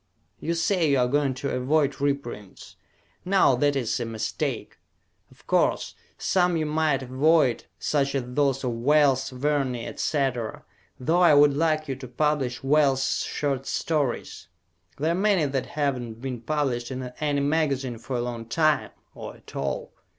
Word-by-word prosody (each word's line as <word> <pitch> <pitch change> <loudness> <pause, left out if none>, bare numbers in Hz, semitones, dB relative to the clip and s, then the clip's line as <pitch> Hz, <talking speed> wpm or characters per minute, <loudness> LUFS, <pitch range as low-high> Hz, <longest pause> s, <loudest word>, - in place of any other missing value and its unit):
You 170 - -2
say 165 -1 +1
you 140 - +3
are 125 -1 +3
going 140 0 +1
to 140 +2 -3
avoid 140 +2 +1
reprints. 140 -8 -4 0.5
Now 190 -7 +4
that 145 +2 +2
is 125 -4 -1
a 120 - -2
mistake. 110 -1 -4 0.5
Of - - -22
course, - - +1 0.2
some 180 -2 +2
you 155 - 0
might 150 -3 +1
avoid, 130 0 +2
such 140 -2 0
as 135 - 0
those 135 +1 0
of 125 - 0
Wells, 135 +2 +3
Verne, 135 0 0
etc., 125 -1 -2 0.3
though 165 +8 +2
I 170 -4 +6
would 145 0 +6
like 155 0 +1
you 135 - -2
to 130 -1 -9
publish 135 -1 -1
Wells' 135 -2 +2
short 135 -2 -2
stories. 145 -6 -2 0.5
There 155 +4 0
are - - +2
many 190 -3 +2
that 135 -2 -2
have 140 -4 -1
not 115 -2 -8
been 125 -2 -5
published 125 -2 -1
in 130 -1 -5 0.2
any 145 -2 0
magazine 140 -5 0
for 125 +3 -5
a 120 - 0
long 120 -2 -5
time, 155 +4 +2 0.2
or - - -8
at - - -16
all. - - -3
140 Hz, 160 wpm, -25 LUFS, 125-150 Hz, 0.5 s, I